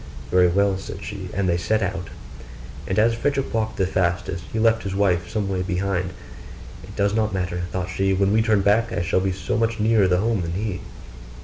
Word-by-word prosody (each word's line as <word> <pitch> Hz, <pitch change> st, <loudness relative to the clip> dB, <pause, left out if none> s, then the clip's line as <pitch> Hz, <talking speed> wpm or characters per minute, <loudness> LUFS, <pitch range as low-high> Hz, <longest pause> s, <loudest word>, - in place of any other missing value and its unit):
'Very 90 Hz, 0 st, +5 dB
well,' 95 Hz, +2 st, +2 dB
said 95 Hz, 0 st, -8 dB
she; 95 Hz, -3 st, -6 dB
and 100 Hz, -1 st, -1 dB
they 85 Hz, -1 st, +2 dB
set 105 Hz, +5 st, 0 dB
out: 95 Hz, -2 st, -3 dB, 0.8 s
and 95 Hz, -, -1 dB
as 115 Hz, +2 st, +4 dB
Frederick 135 Hz, +3 st, -1 dB
walked 110 Hz, -1 st, -1 dB
the 95 Hz, -, +2 dB
fastest, 90 Hz, 0 st, -1 dB
he -, -, -3 dB
left 110 Hz, 0 st, +3 dB
his 95 Hz, -1 st, -4 dB
wife 90 Hz, -4 st, +1 dB
some 105 Hz, -3 st, -1 dB
way 95 Hz, -1 st, -1 dB
behind. 90 Hz, -1 st, -1 dB, 0.7 s
'It -, -, -11 dB
does 100 Hz, 0 st, +1 dB
not 110 Hz, -2 st, 0 dB
matter,' 90 Hz, -1 st, -2 dB
thought 90 Hz, -1 st, -2 dB
she: 95 Hz, +1 st, +1 dB
'when 95 Hz, +1 st, +2 dB
we 110 Hz, -, +4 dB
turn 110 Hz, -3 st, +3 dB
back, 110 Hz, +4 st, +2 dB
I 90 Hz, -, -1 dB
shall 90 Hz, -, +1 dB
be 95 Hz, 0 st, 0 dB
so 110 Hz, +5 st, -2 dB
much 115 Hz, -1 st, 0 dB
nearer 110 Hz, -2 st, +4 dB
home 110 Hz, +1 st, +1 dB
than 85 Hz, -1 st, -3 dB
he. 100 Hz, 0 st, -3 dB
95 Hz, 210 wpm, -23 LUFS, 90-110 Hz, 0.8 s, Very